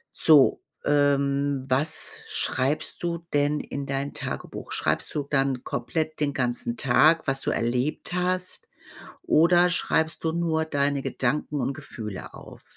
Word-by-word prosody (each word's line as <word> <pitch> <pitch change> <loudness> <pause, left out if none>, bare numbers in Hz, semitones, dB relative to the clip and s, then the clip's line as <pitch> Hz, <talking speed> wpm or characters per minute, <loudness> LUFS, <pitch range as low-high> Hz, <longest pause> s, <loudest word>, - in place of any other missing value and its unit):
So, 150 -4 +5 0.2
ähm, 140 -1 +1
was 140 +5 +1
schreibst 140 +7 -1
du 170 -1 -3
denn 145 +1 +1
in 140 0 -5
dein 140 +1 -3
Tagebuch? - - -6
Schreibst - - -1
du 145 -2 -2
dann 135 -3 0
komplett 155 +6 -3
den 145 -2 0
ganzen 120 -1 -2
Tag, 155 +5 +4
was 135 0 0
du - - -1
erlebt 125 +9 -1
hast 180 0 -2 0.6
oder 175 +2 +4
schreibst 160 -2 +1
du 160 - +1
nur 160 -1 0
deine 140 -2 0
Gedanken 140 +2 -1
und 140 - -1
Gefühle 105 -6 -8
auf? - - -13
145 Hz, 135 wpm, -25 LUFS, 135-160 Hz, 0.6 s, So